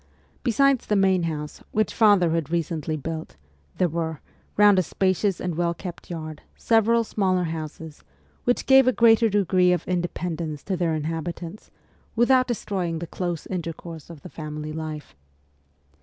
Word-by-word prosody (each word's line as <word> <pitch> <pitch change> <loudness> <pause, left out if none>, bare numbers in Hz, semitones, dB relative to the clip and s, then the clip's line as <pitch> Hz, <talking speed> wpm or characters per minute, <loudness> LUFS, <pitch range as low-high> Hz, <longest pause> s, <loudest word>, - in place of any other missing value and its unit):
Besides 275 +1 +2
the 210 - +2
main 190 -2 +3
house, 150 -1 -6
which 215 0 +1
father 200 -6 +4
had 165 -3 -1
recently 160 -1 -2
built, 160 +2 -6 0.4
there 180 - +3
were, 160 -1 -3 0.4
round 205 -2 +6
a - - +5
spacious 190 +2 0
and 180 -1 -2
well 170 +1 0
kept 175 0 -8
yard, 155 -3 -6
several 230 +1 +3
smaller 185 -4 0
houses, 160 -1 -6 0.4
which 245 - +1
gave 265 -1 +6
a 255 - +4
greater 230 -1 +5
degree 185 -3 +3
of 175 -2 -1
independence 170 -4 -3
to 195 - -2
their 170 -2 0
inhabitants, 165 +4 -5 0.5
without 255 +2 +4
destroying 190 -8 -2
the 170 - -5
close 175 -1 -4
intercourse 165 -3 -6
of 165 -4 -11
the 180 - -9
family 155 -1 -6
life. 155 - -6
175 Hz, 150 wpm, -24 LUFS, 160-205 Hz, 0.5 s, round